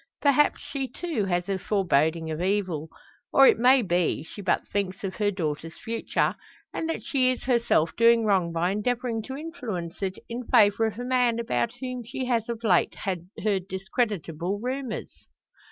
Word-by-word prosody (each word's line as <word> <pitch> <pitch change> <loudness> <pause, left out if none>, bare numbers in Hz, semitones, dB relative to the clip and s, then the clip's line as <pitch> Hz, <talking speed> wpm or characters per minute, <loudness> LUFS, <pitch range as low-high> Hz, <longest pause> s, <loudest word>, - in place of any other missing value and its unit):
Perhaps 285 0 +3
she 275 -2 -4
too, 310 - -3
has 175 -2 -1
a 195 -1 -1
foreboding 165 -5 +1
of 155 +2 -3
evil; 180 -5 -1 0.4
or, 275 - +7
it - - +5
may 255 +1 +5
be, 175 -5 0
she 205 - -10
but 190 - 0
thinks 195 -1 -2
of 190 -1 -4
her 210 -1 +2
daughter's 165 -4 -4
future, 230 0 -1 0.4
and 325 - -3
that 325 - -3
she 260 -3 +2
is 255 - -4
herself 235 -10 +2
doing 230 -1 +5
wrong 190 -5 +2
by 170 +2 0
endeavouring 235 +2 -1
to 265 +5 -7
influence 240 - -6
it 190 -1 -2
in 235 +1 -6
favour 205 +2 +5
of 215 -1 -5
a 245 - -4
man 250 -2 +2
about 235 0 -1
whom 255 -1 -4
she 255 +3 -4
has 235 -2 0
of 235 0 -4
late 220 - +3
heard 190 +1 -3
discreditable 190 -2 -2
rumours. 255 0 -5
210 Hz, 170 wpm, -26 LUFS, 185-245 Hz, 0.4 s, or